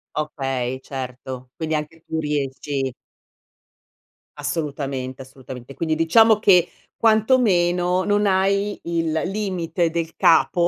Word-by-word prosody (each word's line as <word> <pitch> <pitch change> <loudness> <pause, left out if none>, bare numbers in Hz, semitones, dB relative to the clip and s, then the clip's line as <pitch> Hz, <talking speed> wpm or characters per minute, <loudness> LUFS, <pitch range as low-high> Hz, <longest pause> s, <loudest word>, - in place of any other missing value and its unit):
Okay, 135 -4 -2
certo. 130 -1 -7
Quindi 160 -1 -3
anche 155 +2 -5
tu 160 - -3
riesci 140 -2 -2 1.4
Assolutamente, 140 -3 -3
assolutamente. 130 -1 -10
Quindi 160 -1 -1
diciamo 215 +7 +5
che, 180 -5 +5 0.4
quantomeno 185 -6 +3
non 205 0 +2
hai 200 +1 +1
il 165 -1 -1
limite 185 -4 -1
del 165 0 -3
capo, 170 +1 +4
160 Hz, 100 wpm, -22 LUFS, 135-185 Hz, 1.4 s, diciamo